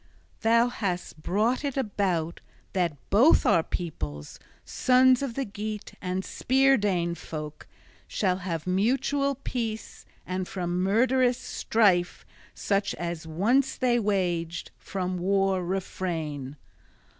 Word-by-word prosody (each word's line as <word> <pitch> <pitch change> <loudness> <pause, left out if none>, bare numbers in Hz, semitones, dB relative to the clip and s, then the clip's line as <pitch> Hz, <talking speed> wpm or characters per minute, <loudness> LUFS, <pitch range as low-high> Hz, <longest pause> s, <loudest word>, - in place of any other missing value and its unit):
Thou 230 +1 +4
hast 180 -8 -4
brought 220 - +1
it 280 -2 -2
about 190 -9 -1 0.3
that 175 -6 0
both 245 +11 +6
our 165 - +5
peoples, 75 - -5 0.3
sons 255 0 +4
of 265 -5 -3
the 275 - -1
Geat 210 +1 -6
and 185 0 -2
Spear 270 +1 +3
Dane 180 -6 0
folk, 155 -2 -7 0.4
shall 185 -3 0
have 170 -4 -4
mutual 265 +9 +1
peace, 230 -5 -5 0.2
and 185 0 -3
from 180 -1 -2
murderous 245 +5 +3
strife, 190 -6 +1 0.3
such 200 -1 0
as 170 0 -5
once 225 - +2
they 245 -2 +2
waged, 175 -5 -1
from 185 -1 -3
war 195 0 +1
refrain. 165 -6 -3
195 Hz, 115 wpm, -27 LUFS, 175-235 Hz, 0.4 s, both